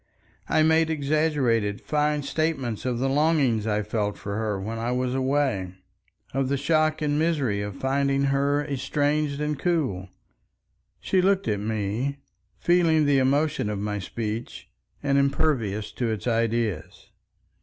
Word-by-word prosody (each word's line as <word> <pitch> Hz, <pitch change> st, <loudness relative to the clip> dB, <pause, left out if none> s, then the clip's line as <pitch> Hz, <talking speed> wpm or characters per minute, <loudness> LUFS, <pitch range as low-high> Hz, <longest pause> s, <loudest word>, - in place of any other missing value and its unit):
I 155 Hz, -, +4 dB
made 160 Hz, 0 st, +3 dB
exaggerated 140 Hz, -9 st, +1 dB
fine 150 Hz, -1 st, 0 dB
statements 140 Hz, -7 st, -2 dB
of 125 Hz, -2 st, 0 dB
the 130 Hz, +3 st, 0 dB
longing 135 Hz, -6 st, +2 dB
I 105 Hz, 0 st, 0 dB
felt 105 Hz, -1 st, -2 dB
for 100 Hz, 0 st, -5 dB
her 110 Hz, -2 st, -1 dB
when 110 Hz, +4 st, -4 dB
I 115 Hz, +2 st, -1 dB
was 125 Hz, 0 st, -1 dB
away, 130 Hz, -9 st, 0 dB, 0.6 s
of 135 Hz, 0 st, 0 dB
the 140 Hz, -, +1 dB
shock 155 Hz, +1 st, +1 dB
and 145 Hz, 0 st, +1 dB
misery 140 Hz, -11 st, +1 dB
of 100 Hz, -1 st, -5 dB
finding 140 Hz, +2 st, +1 dB
her 140 Hz, +1 st, +1 dB
estranged 145 Hz, +1 st, -1 dB
and 150 Hz, -1 st, -2 dB
cool. 135 Hz, -, -1 dB, 0.9 s
She 190 Hz, -, +1 dB
looked 195 Hz, +1 st, +2 dB
at 105 Hz, -2 st, 0 dB
me, 110 Hz, +6 st, -2 dB, 0.4 s
feeling 165 Hz, -3 st, +3 dB
the 140 Hz, -1 st, +4 dB
emotion 140 Hz, -3 st, +1 dB
of 105 Hz, -, -2 dB
my 105 Hz, +1 st, -2 dB
speech 110 Hz, +3 st, -5 dB, 0.3 s
and 140 Hz, -1 st, +3 dB
impervious 135 Hz, -7 st, 0 dB
to 120 Hz, -2 st, -2 dB
its 110 Hz, -4 st, -3 dB
ideas. 115 Hz, -6 st, -1 dB
135 Hz, 145 wpm, -25 LUFS, 110-150 Hz, 0.9 s, I